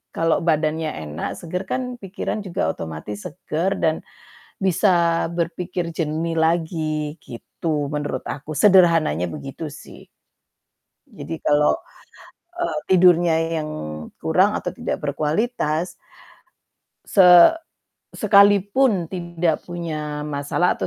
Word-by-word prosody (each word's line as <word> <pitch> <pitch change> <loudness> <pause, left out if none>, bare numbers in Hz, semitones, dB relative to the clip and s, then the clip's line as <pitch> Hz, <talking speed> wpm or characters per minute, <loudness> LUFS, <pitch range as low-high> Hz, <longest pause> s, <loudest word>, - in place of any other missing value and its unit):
Kalau 165 0 +2
badannya 155 -1 0 0.2
enak, 75 +2 -4
seger, 180 +2 -4
kan 260 - 0 0.2
pikiran 195 +2 -4
juga 180 - -3
otomatis 80 +6 -7
seger 170 +2 -3
dan 160 -1 +3 0.6
bisa 190 +1 +2 0.5
berpikir 170 0 -3
jernih 165 +1 -2
lagi, 160 -2 0
gitu 145 +5 -4
menurut 145 -3 -3
aku, 150 +2 -6
sederhananya 165 - +4
begitu 140 +3 -7
sih. 150 - -13 1.1
Jadi 175 -5 -7
kalau, 150 0 +3 0.8
eee, 345 -3 -2
tidurnya 175 -2 +5 0.2
yang 155 -1 -3 0.5
kurang - - +2
atau - - -4
tidak - - -3
berkualitas 155 - -1 1.1
se 195 - +4 0.9
sekalipun 200 0 +4
tidak 170 -3 -2
punya 155 -4 -4
masalah 145 +4 0
atau - - -2
165 Hz, 100 wpm, -22 LUFS, 150-180 Hz, 1.1 s, tidurnya